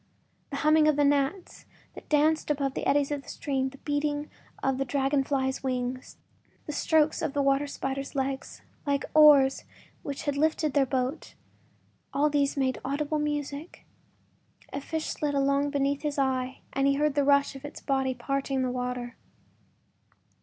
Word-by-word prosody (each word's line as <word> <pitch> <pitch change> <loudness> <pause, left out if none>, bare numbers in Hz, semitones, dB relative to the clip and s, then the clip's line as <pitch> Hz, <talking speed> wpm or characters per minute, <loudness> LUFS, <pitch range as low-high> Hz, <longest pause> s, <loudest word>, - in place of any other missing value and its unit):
The 280 - -5
humming 305 +1 +4
of 305 - +4
the 290 - +3
gnats 285 +6 0 0.3
that - - -12
danced 305 +1 +2
above 280 -2 0
the - - -3
eddies 285 0 +2
of 290 -1 -2
the - - -14
stream, 265 -2 -2
the 275 - -14
beating 290 +1 -2 0.3
of 270 -1 +1
the - - +2
dragon 275 +1 +1
flies’ 265 -1 -1
wings, 255 -1 -3 0.5
the - - -4
strokes 310 +1 +2
of 275 - -2
the 285 - +1
water 275 +1 +2
spiders’ 275 0 -4
legs, 270 0 -3 0.2
like 280 0 +1
oars 290 -3 +6 0.4
which 280 -1 -5
had 285 -1 -1
lifted 310 -1 +1
their 275 -2 +3
boat—all 275 +2 -4
these 285 -1 +1
made 260 -1 0
audible 295 +3 -1
music. 295 +1 -4 0.9
A 275 - -3
fish 320 +2 -3
slid 290 -1 -2
along 280 +1 +2
beneath 280 0 0
his 295 -1 -3
eyes 260 -1 0 0.2
and 275 +1 +2
he 275 - +3
heard 300 0 +1
the 285 0 +2
rush 280 0 +3
of 270 - -10
its 290 - -8
body 265 -2 0
parting 270 +1 -1
the 255 - -1
water. 250 -1 -4
280 Hz, 165 wpm, -28 LUFS, 270-295 Hz, 0.9 s, oars